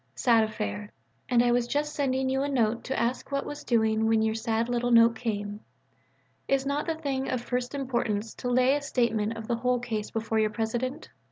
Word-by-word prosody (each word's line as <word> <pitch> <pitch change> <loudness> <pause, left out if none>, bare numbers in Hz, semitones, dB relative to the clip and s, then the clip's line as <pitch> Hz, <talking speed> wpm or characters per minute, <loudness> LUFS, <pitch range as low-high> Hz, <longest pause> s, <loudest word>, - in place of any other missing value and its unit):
sad 230 -3 +4
affair. 210 -1 -4 0.4
And 240 -1 +4
I 240 - +3
was 240 0 +2
just 295 +3 -1
sending 265 -2 0
you 265 +1 0
a 285 - -1
note 235 -4 +1
to 265 - -2
ask 240 +4 -1
what 275 0 -1
was 290 0 -7
doing 220 -2 +2
when 225 0 +3
your 220 0 +1
sad 225 0 -1
little 245 0 0
note 230 -1 +6
came. 210 -3 -3 0.9
Is 275 0 +1
not 285 +3 -1
the 325 - 0
thing 275 -4 -2
of 255 - 0
first 250 +2 -3
importance 235 -5 -2
to 245 - -2
lay 255 +2 +4
a 290 - -1
statement 230 -5 0
of 220 -1 -7
the 235 - 0
whole 250 +1 +1
case 225 -3 -3
before 225 0 -1
your 215 0 +2
President? 240 +7 -3
240 Hz, 205 wpm, -27 LUFS, 220-265 Hz, 0.9 s, note